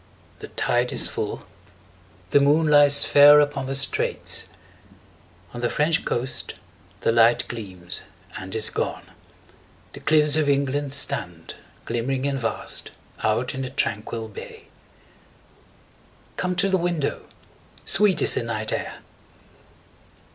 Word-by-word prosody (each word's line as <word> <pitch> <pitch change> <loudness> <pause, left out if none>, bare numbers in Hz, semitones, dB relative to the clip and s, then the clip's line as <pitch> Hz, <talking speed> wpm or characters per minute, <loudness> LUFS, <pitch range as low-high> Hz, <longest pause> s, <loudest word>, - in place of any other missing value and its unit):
The - - -8
tide 120 +1 0
is - - +2
full, - - -5 0.9
the 145 - +6
moon 145 +3 +3
lies 145 -1 +5
fair 145 +1 +8
Upon 145 -2 0
the 135 - -2
straits; 140 +1 -1 1.1
on 120 - -6
the 120 - 0
French 155 +3 +1
coast 125 +2 -3 0.5
the - - +2
light 115 +1 +4
Gleams 95 -6 -6 0.3
and 95 +2 -7
is 110 -1 +2
gone; - - -3 0.9
the - - -9
cliffs 150 -1 +3
of 150 -2 +1
England 140 0 0
stand, 90 - -2 0.3
Glimmering 130 +3 -2
and 140 -1 -1
vast, 115 -2 -3 0.3
out 115 +4 0
in 135 - -4
the 130 - -4
tranquil 115 -3 -3
bay. 105 - -11 1.7
5 - - -32
Come 180 0 -1
to 190 +2 +2
the 190 - +2
window, 170 -5 -2 0.6
sweet 205 -3 +3
is - - +2
the - - 0
night 110 -2 -3
air! - - -5
135 Hz, 130 wpm, -23 LUFS, 115-145 Hz, 1.7 s, fair